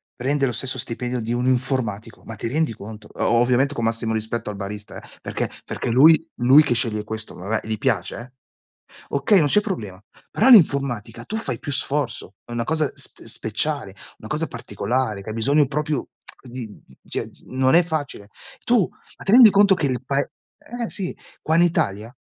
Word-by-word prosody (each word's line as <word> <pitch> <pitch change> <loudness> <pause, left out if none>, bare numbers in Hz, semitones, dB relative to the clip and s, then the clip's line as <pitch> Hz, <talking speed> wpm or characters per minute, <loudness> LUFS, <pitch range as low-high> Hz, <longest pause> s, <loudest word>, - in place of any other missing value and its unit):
prende 140 +2 0
lo 125 - -1
stesso 130 0 -1
stipendio 125 0 -3
di 115 +1 -3
un 125 +1 -1
informatico, 125 -4 -2
ma 115 - -8
ti - - -4
rendi 150 +1 0
conto? 105 0 -11
O - - -2
ovviamente 125 +3 +2
con 120 - -4
massimo 115 0 0
rispetto 110 0 -3
al - - -8
barista, 105 +1 -7
eh, - - -16
perché - - -3 0.2
perché - - -4
lui 155 +7 +6
lui 130 +5 +6
che - - +1
sceglie 110 -3 +1
questo, 110 0 -6
vabbè 105 +4 -3
gli 110 - -2
piace 120 -1 -1
eh 125 +2 -10 0.8
okay, 140 +8 +3
non 150 - +3
c'è 175 - +5
problema. 105 - -5 0.3
Però - - +2
all'informatica 135 - +4
tu 220 - -5
fai 130 - -3
più 145 - -5
sforzo, 130 -9 -1
è - - -13
una 120 0 -1
cosa 155 -1 0
sp - - -5
speciale, 110 -1 -2 0.3
una 110 - -10
cosa 155 +2 -1
particolare, 120 -2 -3
che 110 - -8
hai 110 - -5
bisogno 140 +5 +2
proprio 150 -1 -2 0.4
di 125 -2 -7 0.2
di 65 - -21
cio, - - -3 0.2
non 130 +2 +2
è 175 - +6
facile. 145 -11 -5 0.4
Tu 235 -7 +3 0.3
ma - - -11
ti 195 - +1
rendi 240 -2 +10
conto 200 0 +5
che 155 -5 0
il 125 -3 -2
pae 140 +1 -1 0.5
eh 230 - -2
sì, 190 -3 -3 0.3
qua 160 - 0
in 175 - +6
Italia, 115 - -1
125 Hz, 190 wpm, -22 LUFS, 110-150 Hz, 0.8 s, rendi